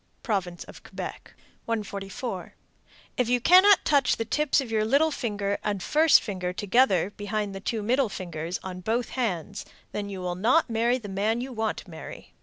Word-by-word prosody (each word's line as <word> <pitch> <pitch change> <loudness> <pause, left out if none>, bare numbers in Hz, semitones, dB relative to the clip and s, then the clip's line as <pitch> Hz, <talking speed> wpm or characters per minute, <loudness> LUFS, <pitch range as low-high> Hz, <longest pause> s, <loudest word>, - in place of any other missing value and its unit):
Province 185 -6 -2
of - - -13
Quebec. - - -8 0.3
144. 200 -2 -4 0.6
If 250 -2 +1
you 245 0 +3
cannot 370 - +6
touch 280 -4 +3
the 225 - -2
tips 300 +6 +2
of 260 -5 -4
your 215 -1 +2
little 280 +8 +3
finger 205 -6 -2
and 205 -3 -2
first 315 +1 +5
finger 185 -5 -3
together 200 -1 +2
behind 205 0 -3
the 195 - -6
two 215 +2 -3
middle 250 +2 +2
fingers, 170 -2 -5
on 185 -1 -6
both 230 +5 -1
hands, 200 -5 -3 0.3
then 205 -1 -4
you 195 -2 -6
will 180 -1 -2
not 235 - +2
marry 235 +2 +2
the 225 -5 -9
man 205 +4 0
you 255 +1 -5
want 220 -2 -1
to 195 - -10
marry. 160 - -10
215 Hz, 180 wpm, -26 LUFS, 195-245 Hz, 0.6 s, cannot